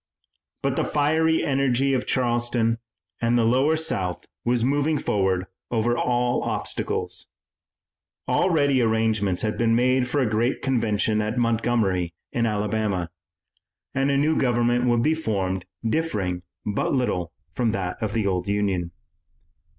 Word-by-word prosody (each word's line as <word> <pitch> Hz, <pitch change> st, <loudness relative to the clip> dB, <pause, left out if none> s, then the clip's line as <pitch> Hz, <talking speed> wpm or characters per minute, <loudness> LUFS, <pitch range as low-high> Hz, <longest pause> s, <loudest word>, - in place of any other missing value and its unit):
But -, -, 0 dB
the -, -, +2 dB
fiery 160 Hz, +2 st, +2 dB
energy 135 Hz, -1 st, +1 dB
of 130 Hz, -, -1 dB
Charleston 120 Hz, -2 st, +1 dB, 0.4 s
and 120 Hz, +1 st, +2 dB
the 120 Hz, -, +3 dB
lower 130 Hz, +7 st, +3 dB
South 95 Hz, -, -1 dB, 0.2 s
was 120 Hz, -1 st, +1 dB
moving 145 Hz, +4 st, +1 dB
forward 95 Hz, -6 st, 0 dB, 0.2 s
over 120 Hz, +1 st, +1 dB
all 120 Hz, 0 st, +1 dB
obstacles. -, -, -2 dB, 1.0 s
Already 145 Hz, -7 st, +3 dB
arrangements 110 Hz, -4 st, +1 dB
had 110 Hz, -1 st, -1 dB
been 115 Hz, -1 st, +3 dB
made 125 Hz, +1 st, +2 dB
for 145 Hz, +3 st, 0 dB
a 130 Hz, -, +2 dB
great 115 Hz, +4 st, 0 dB
convention 110 Hz, -4 st, +1 dB
at 110 Hz, +3 st, -2 dB
Montgomery 110 Hz, -7 st, +1 dB, 0.2 s
in 120 Hz, -4 st, +1 dB
Alabama, 105 Hz, -4 st, -1 dB, 0.8 s
and 135 Hz, +1 st, +1 dB
a 140 Hz, -, +2 dB
new 155 Hz, +3 st, +2 dB
government 120 Hz, -1 st, +2 dB
would 120 Hz, -1 st, +2 dB
be 155 Hz, -, +3 dB
formed 95 Hz, -, -2 dB, 0.2 s
differing 105 Hz, -, -1 dB, 0.2 s
but 105 Hz, +6 st, 0 dB
little 95 Hz, -9 st, -1 dB, 0.2 s
from 120 Hz, +5 st, +1 dB
that 95 Hz, +1 st, -3 dB
of 110 Hz, -2 st, -2 dB
the 110 Hz, -3 st, 0 dB
old 90 Hz, -2 st, -1 dB
Union. 100 Hz, -4 st, 0 dB
115 Hz, 135 wpm, -24 LUFS, 105-130 Hz, 1.0 s, the